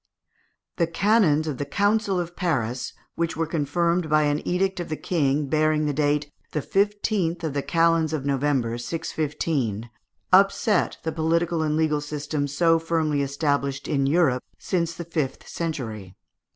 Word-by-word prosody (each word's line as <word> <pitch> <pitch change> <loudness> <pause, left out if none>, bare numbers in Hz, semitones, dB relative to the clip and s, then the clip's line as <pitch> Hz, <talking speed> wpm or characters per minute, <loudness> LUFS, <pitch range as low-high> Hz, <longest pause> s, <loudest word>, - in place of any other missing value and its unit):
The 170 - +2
canons 165 -4 +3
of 145 -5 -3
the - - 0
Council 205 +4 +1
of 175 0 -4
Paris, 125 - -1 0.2
which 170 -1 -2
were 165 - +1
confirmed 170 +2 0
by 155 0 +4
an 145 0 +1
edict 190 +1 0
of 175 - -4
the 155 - -1
King 145 -4 0
bearing 155 +1 +2
date 145 0 0 0.2
the 150 - 0
15th 200 -4 0
of 155 -3 -2
the 140 - 0
calends 165 0 +2
of 150 -4 -3
November, 135 -4 0
615, 140 -6 -2 0.4
upset 195 +1 +4
the 160 - -1
political 165 +1 0
and 155 -1 0
legal 155 -2 +1
system 145 0 -3
so 165 +3 +3
firmly 160 -3 0
established 140 -1 -1
in 140 -3 +1
Europe 140 -5 +2
since 170 -3 -1
the 170 - -6
fifth 155 -5 -3
century. 110 - -5
155 Hz, 150 wpm, -24 LUFS, 145-170 Hz, 0.4 s, by